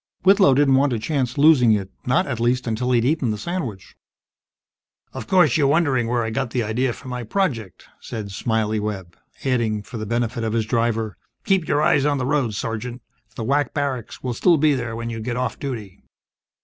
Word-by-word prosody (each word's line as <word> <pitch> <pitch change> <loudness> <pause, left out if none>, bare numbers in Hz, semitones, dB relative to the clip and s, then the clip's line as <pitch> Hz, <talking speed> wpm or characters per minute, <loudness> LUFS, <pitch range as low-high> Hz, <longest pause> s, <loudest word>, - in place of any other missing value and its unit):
Whitlow 190 -7 +5
didn't 140 -1 +4
want 140 +2 +4
to - - 0
chance 130 +2 -2
losing 140 -6 +6
it. 95 -2 -2 0.2
Not, 130 +9 +3
at 120 - -4
least, 125 +2 +1
until 120 +2 -1
he'd 120 -1 +3
eaten 140 -3 +1
the 105 - -1
sandwich. 125 - -5 1.2
"Of - - -7
course, 180 -9 +4
you're 145 -3 +3
wondering 140 -6 +2
where 120 0 0
I 110 - -3
got 135 +1 -2
the 120 0 -1
idea 120 +4 0
for 130 - -10
my 125 -1 -4
project," 115 - -2
said 105 -3 -6
"Smiley" 110 +1 -1
Webb, 95 -5 -5 0.3
adding, 115 -5 0
for 115 - -8
the 110 - -5
benefit 120 +1 -1
of 110 -1 -1
his 115 -1 0
driver, 115 -2 -1 0.3
"Keep 190 -4 +2
your 145 +1 +2
eyes 145 -2 +3
on 145 -1 +1
the 130 - -2
road, 135 -6 0
Sergeant! 115 +3 -4 0.3
The 115 - -4
WAC 140 +1 0
barracks 135 -5 -3
will 125 -2 -2
still 170 +7 +3
be 150 0 +3
there 120 -4 -3
when 115 0 -4
you 115 - -5
get 120 +2 -3
off 125 -3 -2
duty!" 110 -9 -6
125 Hz, 200 wpm, -22 LUFS, 110-140 Hz, 1.2 s, losing